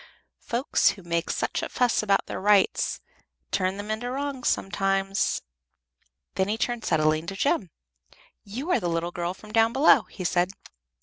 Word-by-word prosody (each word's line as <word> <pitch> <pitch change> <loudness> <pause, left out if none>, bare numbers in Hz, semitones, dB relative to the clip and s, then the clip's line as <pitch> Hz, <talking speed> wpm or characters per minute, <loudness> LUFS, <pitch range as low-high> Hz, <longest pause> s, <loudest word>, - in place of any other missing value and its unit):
Folks 245 +4 +1
who 195 - -6
make 170 0 -1
such - - -1
a - - -4
fuss 245 -2 +2
about 200 -2 +2
their - - -5
rights 205 -1 +2 0.5
turn 185 0 0
them 205 +1 -5
into 230 +3 -3
wrongs 275 -1 -3
sometimes." 195 +1 0 0.9
Then 190 - 0
he 215 +2 -1
turned 240 -1 -2
suddenly 155 -1 +2
to 170 +4 -6
Jem. 235 - 0 0.7
"You 255 - -5
are - - +3
the 175 - -2
little 165 +1 -1
girl 175 +1 -3
from 215 +1 -13
down 225 +1 +3
below," 275 +4 +5
he 185 - -7
said. 180 +2 +1
195 Hz, 165 wpm, -26 LUFS, 180-235 Hz, 0.9 s, below